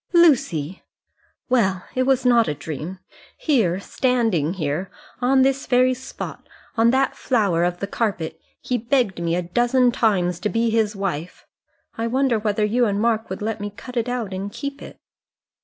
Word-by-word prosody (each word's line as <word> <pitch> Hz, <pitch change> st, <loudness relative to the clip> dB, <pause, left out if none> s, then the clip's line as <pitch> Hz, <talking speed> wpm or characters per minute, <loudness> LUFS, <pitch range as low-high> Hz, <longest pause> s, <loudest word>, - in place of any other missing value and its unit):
"Lucy!" 195 Hz, -, +3 dB, 0.7 s
"Well, 195 Hz, -8 st, +1 dB
it 255 Hz, 0 st, 0 dB
was 265 Hz, -1 st, +2 dB
not 235 Hz, -2 st, +5 dB
a 150 Hz, -, -1 dB
dream. 155 Hz, +5 st, -6 dB, 0.4 s
Here, 215 Hz, -, +1 dB
standing 220 Hz, -, 0 dB
here, 160 Hz, +2 st, -2 dB, 0.3 s
on 260 Hz, +1 st, +4 dB
this 270 Hz, 0 st, +1 dB
very 255 Hz, 0 st, +4 dB
spot 255 Hz, +1 st, -8 dB, 0.3 s
on 230 Hz, 0 st, +4 dB
that 265 Hz, +2 st, +2 dB
flower 200 Hz, -9 st, +1 dB
of 175 Hz, 0 st, -1 dB
the -, -, 0 dB
carpet 200 Hz, -6 st, -3 dB, 0.2 s
he 250 Hz, -1 st, -1 dB
begged 235 Hz, -6 st, 0 dB
me 170 Hz, 0 st, 0 dB
a 180 Hz, -, -1 dB
dozen 240 Hz, +7 st, +2 dB
times 185 Hz, -8 st, +1 dB
to 210 Hz, -, -1 dB
be 230 Hz, +1 st, +1 dB
his 220 Hz, -1 st, +1 dB
wife. 180 Hz, -4 st, -4 dB, 0.5 s
I 230 Hz, -, 0 dB
wonder 255 Hz, -1 st, +1 dB
whether 210 Hz, 0 st, 0 dB
you 240 Hz, +3 st, +2 dB
and 200 Hz, 0 st, 0 dB
Mark 225 Hz, 0 st, +1 dB
would 190 Hz, +2 st, -5 dB
let 220 Hz, -1 st, -3 dB
me 205 Hz, -, -3 dB
cut 250 Hz, +5 st, -11 dB
it 235 Hz, 0 st, 0 dB
out 235 Hz, -6 st, -3 dB
and 195 Hz, +2 st, -4 dB
keep 280 Hz, +4 st, -6 dB
it." -, -, -10 dB
220 Hz, 175 wpm, -22 LUFS, 185-250 Hz, 0.7 s, not